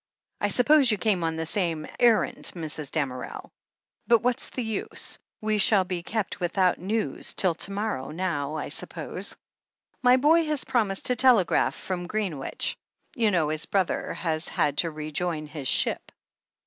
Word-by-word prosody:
I - - +1
suppose 280 +1 +4
you 210 - +2
came 190 -3 +1
on 165 0 -1
the 160 0 -3
same 165 -3 -1
errand, 235 -3 +3
Mrs. 155 -3 -5
Damerel? 135 -5 -4 0.6
But 235 -1 +4
what's 245 -1 0
the 255 - -4
use 220 -2 -2
— - - -59
we 215 -1 0
shall 200 -1 +5
be 180 -1 -4
kept 205 +2 -3
without 180 0 +1
news 215 +5 -2
till 185 -3 +3
to 185 +4 -4
morrow 200 -9 -3
now, 155 -4 -2
I - - -4
suppose. - - -4 0.6
My 250 0 +6
boy 315 +5 +4
has 300 -3 0
promised 215 -7 0
to 250 - +2
telegraph 245 -8 +4
from 175 -2 -4
Greenwich. 185 -9 -2 0.4
You 230 -5 +3
know 170 -6 +1
his 155 0 -1
brother 190 -3 0
has 160 -2 -1
had 145 -1 0
to 170 - +2
rejoin 155 +1 -3
his 150 -3 -6
ship?" - - +1
185 Hz, 160 wpm, -26 LUFS, 160-220 Hz, 0.6 s, My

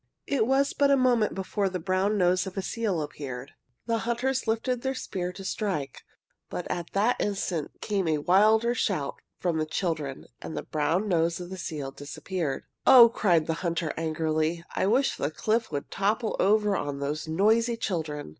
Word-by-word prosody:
It 240 -6 +1
was 275 +2 +2
but 280 0 +3
a 280 - +5
moment 245 -4 +2
before 195 +1 -1
the 185 - -3
brown 190 +4 +1
nose 180 0 +2
of 190 - -8
a 195 - -1
seal 200 -8 -1
appeared. 135 -3 -7 0.3
The 230 -1 0
hunters 245 +3 -1
lifted 235 +2 0
their 265 +1 -2
spears 180 -7 -4
to 195 - -8
strike. 180 - -3 0.5
But 180 - -4
at 175 -1 -4
that 215 +5 +2
instant 185 -6 -2
came 195 -4 -1
a 155 -1 +2
wilder 215 +9 +4
shout 180 -11 -1 0.2
from 170 -3 0
the 155 - 0
children 155 -6 -3 0.2
and - - -6
the - - -3
brown 165 +7 0
nose 170 -2 +1
of 175 0 -8
the - - -4
seal 145 -5 -4
disappeared. 145 +2 -4 0.2
"Oh," 240 -3 +10
cried 175 -9 +2
the 165 - 0
hunter, 170 -3 -1
angrily, 160 +1 -1
"I - - +1
wish 255 +6 +2
the 145 - -1
cliff 220 +7 -1
would 145 -1 -4
topple 215 +3 0
over 210 +1 +3
on 145 -5 -3
those 150 +3 -3
noisy 220 +8 +2
children!" 160 - -3
185 Hz, 180 wpm, -27 LUFS, 160-220 Hz, 0.5 s, Oh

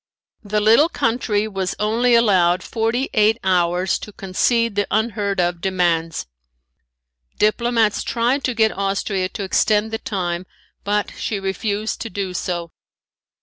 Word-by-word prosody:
The 210 0 0
little 230 +10 +5
country 225 -5 0
was 195 -3 -3
only 235 +3 +2
allowed 185 -6 +3
forty 230 +3 -1
eight 215 +1 +4
hours 180 0 +1
to 210 - -9
concede 230 +4 0
the 205 -1 0
unheardof 200 -6 0
demands. 170 -3 0 1.1
Diplomats 225 0 +2
tried 245 +4 0
to 255 - -1
get 220 -1 +2
Austria 195 -1 -1
to 200 - -6
extend 210 +3 +1
the 225 - -3
time, 180 -2 -3 0.4
but 205 +1 -1
she 210 - -2
refused 200 +2 -2
to 230 - -4
do 190 -1 -4
so. 175 -2 -3
205 Hz, 130 wpm, -20 LUFS, 185-225 Hz, 1.1 s, little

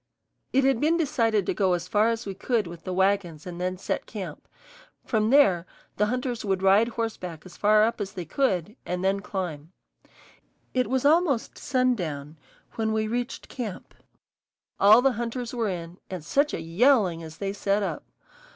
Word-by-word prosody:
It 270 +1 +3
had 270 -3 +2
been 320 +3 +3
decided 230 - +1
to - - 0
go 190 -3 +2
as 175 0 -2
far 210 +4 +3
as 230 +1 -2
we 195 - -4
could 220 +2 0
with 170 -1 -10
the 185 - -3
wagons 190 -4 0
and 175 -1 -7
then 185 0 -1
set 190 - -3
camp; 185 -9 -7 0.6
from 215 -2 +1
there 195 -11 +4 0.3
the 210 - +2
hunters 250 0 -2
would 195 -2 -1
ride 200 +4 +5
horseback 215 -9 -4
as 180 -1 -12
far 215 +1 +4
up 225 0 0
as 195 0 -4
they 180 -4 -5
could 200 - 0
and 180 +1 -3
then 195 +1 +2
climb. 180 -5 -5 1.0
It 255 -1 +1
was 260 +1 0
almost 300 -5 +3
sundown 165 - -1 0.4
when 220 -1 0
we 220 0 0
reached 245 +3 -3
camp. 230 -7 -6 0.9
All 215 +5 +7
the 270 - +4
hunters 240 +1 -4
were 230 -4 0
in, 175 -1 -6
and 180 -5 -6
such 285 - +2
a - - -4
yowling 180 0 +3
as 160 -1 -10
they 195 -1 -3
set 200 0 0
up! - - -3
205 Hz, 180 wpm, -26 LUFS, 180-240 Hz, 1.0 s, All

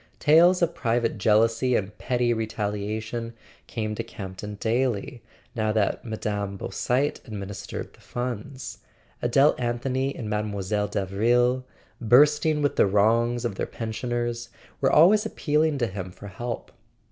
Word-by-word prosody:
Tales 170 +4 +5
of 170 0 +1
private 115 -4 0
jealousy 115 +4 +3
and 105 0 -2
petty 120 -1 +1
retaliation 110 +1 -3 0.3
came 110 -2 -3
to 115 - -3
Campton 105 -2 -7
daily, 120 +2 -1 0.3
now 110 -3 0
that 105 +1 0
Mme. 105 -3 -3
Beausite 130 +8 -1
administered 100 -2 -6
the - - -21
funds; 125 +1 -5 0.4
Adele 135 +5 +4
Anthony 130 +3 -1
and 115 - -5
Mile. 105 0 0
Davril, 105 +5 0 0.4
bursting 150 +6 +4
with 145 - 0
the - - +5
wrongs 115 +4 +2
of 115 - -1
their - - -3
pensioners, 120 +1 -3 0.3
were - - +3
always 195 +7 +6
appealing 155 -7 +1
to 125 - +1
him 95 -3 -5
for 100 +3 -10
help. 120 +5 -5
115 Hz, 130 wpm, -25 LUFS, 105-125 Hz, 0.4 s, always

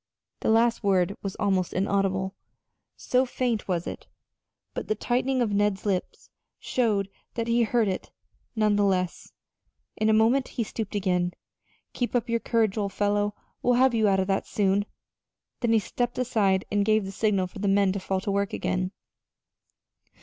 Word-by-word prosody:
The - - -1
last 230 +1 +3
word 195 -1 +2
was 195 -1 -4
almost 190 -4 0
inaudible, 190 0 0 0.6
so 255 +1 +2
faint 245 -3 -2
was 175 -3 -1
it; - - -7 0.7
but - - -5
the 215 - +1
tightening 250 +3 0
of 220 - -1
Ned's 205 -1 +1
lips 190 -3 -3 0.3
showed 215 -6 0 0.3
that 230 -1 -2
he 235 +1 +2
had 230 - +3
heard 235 -3 +2
it, 190 - -3 0.5
none 210 -2 +2
the 205 - +3
less. 185 -3 -1 0.6
In 215 - +1
a - - +5
moment 230 +5 +3
he 235 - +2
stooped 215 -1 -5
again. 180 -3 0 0.6
"Keep 245 0 -2
up 240 - +1
your 230 0 +1
courage, 225 -3 +1
old 200 -2 -2
fellow! 205 0 0 0.3
We'll 245 0 +3
have 260 0 +4
you 220 -2 +3
out 195 -1 +3
of 190 - +1
that 195 0 -1
soon." 200 0 +1 0.7
Then 235 -2 +1
he 225 - +5
stepped 240 +3 -2
aside 210 -7 +1
and 205 -1 +2
gave 215 -1 +2
the 195 - -5
signal 200 -2 +1
for 190 +3 -10
the 200 - -1
men 195 -1 +3
to 200 - -2
fall 190 0 -1
to 200 - -2
work 200 0 0
again. 185 +1 -1
205 Hz, 180 wpm, -26 LUFS, 195-230 Hz, 0.7 s, a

